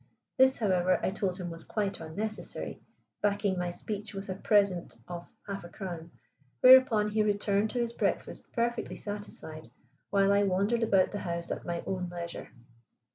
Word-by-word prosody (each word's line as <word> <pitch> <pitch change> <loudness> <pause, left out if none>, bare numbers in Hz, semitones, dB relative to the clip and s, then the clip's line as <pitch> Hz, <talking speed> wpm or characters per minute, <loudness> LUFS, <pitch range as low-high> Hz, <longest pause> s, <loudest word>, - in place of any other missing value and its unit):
This, 260 -1 +5
however, 185 -4 +2
I - - +1
told 190 -2 -1
him 175 -3 -5
was 165 0 -8
quite 205 -2 -2
unnecessary, 205 +7 -5 0.4
backing 200 -2 +1
my 180 0 -1
speech 205 +3 -5
with 195 0 -6
a - - 0
present 200 -3 +2
of 175 -1 -7
half 200 -2 -5
a 175 - -9
crown, 175 -4 -6 0.5
whereupon 255 -5 +7
he 215 +1 +2
returned 205 0 +1
to 245 - -2
his 235 -1 -1
breakfast - - -2
perfectly 235 0 -1
satisfied, 205 -6 -7 0.4
while 200 0 +4
I 200 - +4
wandered 200 +4 +2
about 195 -4 +3
the 205 - -3
house 170 -2 -3
at - - -4
my 170 0 -2
own 180 -2 -2
leisure. 170 -1 -6
200 Hz, 165 wpm, -30 LUFS, 180-210 Hz, 0.5 s, whereupon